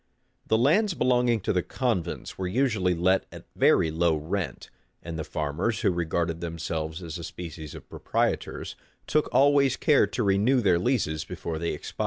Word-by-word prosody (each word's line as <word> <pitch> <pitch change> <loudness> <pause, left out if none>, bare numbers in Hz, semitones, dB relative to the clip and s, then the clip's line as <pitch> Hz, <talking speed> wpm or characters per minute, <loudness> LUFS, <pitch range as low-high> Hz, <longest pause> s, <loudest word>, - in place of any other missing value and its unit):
The 110 - +3
lands 170 - +3
belonging 125 -4 +2
to - - 0
the 90 - +2
convents 115 -5 -2
were 95 - -3
usually 105 -5 +1
let 95 +3 +2
at - - -11
very 80 - +4
low 85 0 +2
rent; 85 +5 -4 0.3
and 85 -1 -6
the 80 - -3
farmers, 80 +10 -2
who - - +3
regarded 85 -1 -1
themselves 80 -1 -4
as 85 0 -6
a - - -7
species 80 -3 -8
of - - -11
proprietors, - - -2 0.3
took 155 - +1
always 140 -1 +4
care 145 -8 +4
to 115 +4 -2
renew 105 +7 +3
their 95 -7 +3
leases 90 - 0
before 80 -2 -5
they 85 - -1
expired. - - -9
90 Hz, 170 wpm, -26 LUFS, 80-120 Hz, 0.3 s, very